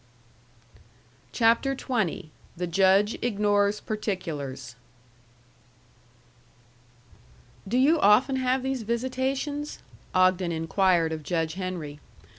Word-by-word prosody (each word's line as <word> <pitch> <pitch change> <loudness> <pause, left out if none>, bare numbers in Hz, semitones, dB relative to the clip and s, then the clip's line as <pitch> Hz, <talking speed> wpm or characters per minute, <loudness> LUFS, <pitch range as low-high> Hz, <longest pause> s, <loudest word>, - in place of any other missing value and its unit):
THE 235 - +1 0.5
JUDGE 195 +4 +3
IGNORES 205 -2 +1
PARTICULARS 150 - -5 2.9
"Do 235 +6 0
you 300 +5 +4
often 255 +5 +4
have 255 0 0
these 265 -1 -2
visitations?" 260 +5 -2 0.4
Ogden 185 -1 +3
inquired 165 0 +1
of 155 - -5
Judge 160 +1 -2
Henry. 175 -6 -5
205 Hz, 75 wpm, -26 LUFS, 170-255 Hz, 2.9 s, you